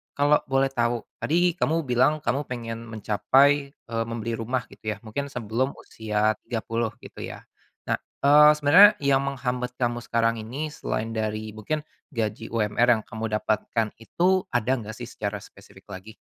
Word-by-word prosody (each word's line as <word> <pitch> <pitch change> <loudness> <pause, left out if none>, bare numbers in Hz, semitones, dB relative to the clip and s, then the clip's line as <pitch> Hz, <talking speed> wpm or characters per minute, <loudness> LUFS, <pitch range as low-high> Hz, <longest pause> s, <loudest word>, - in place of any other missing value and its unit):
kalau 145 +1 +4
boleh 135 0 +2
tau, 120 -2 -1
tadi 175 +2 +2
kamu 165 0 +1
bilang 130 +5 +3
kamu 135 +5 0
pengen 115 -2 -5
mencapai, 135 +6 +2
eee, 115 -1 -4
membeli 115 0 -3
rumah, 125 +2 -2
gitu, 110 - -5
ya, - - -12
mungkin 140 +6 -4
sebelum 125 +3 -1
usia 110 -1 -1
30, 115 -1 -2
gitu, - - -10
ya. - - -9 0.5
Nah, - - +2 0.3
eee, 150 +1 +8
sebenarnya 175 +9 +8
yang 140 -1 +3
menghambat 125 -2 -3
kamu 120 -1 0
sekarang 115 0 +1
ini 140 +8 -4
selain 115 -4 -3
dari 110 0 -3
mungkin 150 +8 -3 0.3
gaji 110 -2 -3
UMR 115 +1 +1
yang - - -11
kamu 110 0 -5
dapatkan 110 +1 -1
itu, 185 +10 +1
ada 120 0 +1
nggak, 110 0 -7
sih, - - -7
secara - - -4
spesifik - - -17
lagi? 105 +4 -9
120 Hz, 160 wpm, -25 LUFS, 110-140 Hz, 0.5 s, eee